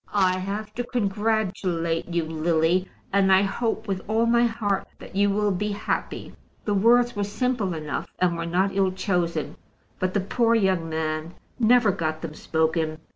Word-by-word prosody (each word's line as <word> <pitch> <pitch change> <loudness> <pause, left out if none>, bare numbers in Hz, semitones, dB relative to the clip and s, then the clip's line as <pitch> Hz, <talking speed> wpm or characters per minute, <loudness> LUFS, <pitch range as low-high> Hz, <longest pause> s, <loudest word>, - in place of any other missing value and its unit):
"I 185 -2 +3
have 200 +3 -4
to 245 - -2
congratulate 195 -7 -1
you, 170 -1 0
Lily, 165 +3 +1 0.2
and 195 -1 +4
I 190 +1 +6
hope 220 +2 -2
with 190 -2 -2
all 220 +2 +2
my 235 +1 +4
heart 215 -4 -1
that - - -12
you 200 +1 +3
will 205 +1 +1
be 205 +2 -1
happy." 205 +2 -3 0.3
The 210 - +1
words 235 +4 +4
were 205 - -1
simple 205 -3 -1
enough, 155 -2 -4
and 180 -2 +2
were 170 0 -3
not 190 +3 +1
ill 190 -1 +2
chosen, 180 -3 -1 0.4
but 185 0 -1
the - - +3
poor 230 +4 +2
young 190 -6 +1
man 160 +1 -3 0.2
never 235 -2 +5
got 160 -4 -3
them 160 -2 -5
spoken. 160 0 0
195 Hz, 170 wpm, -25 LUFS, 170-215 Hz, 0.4 s, I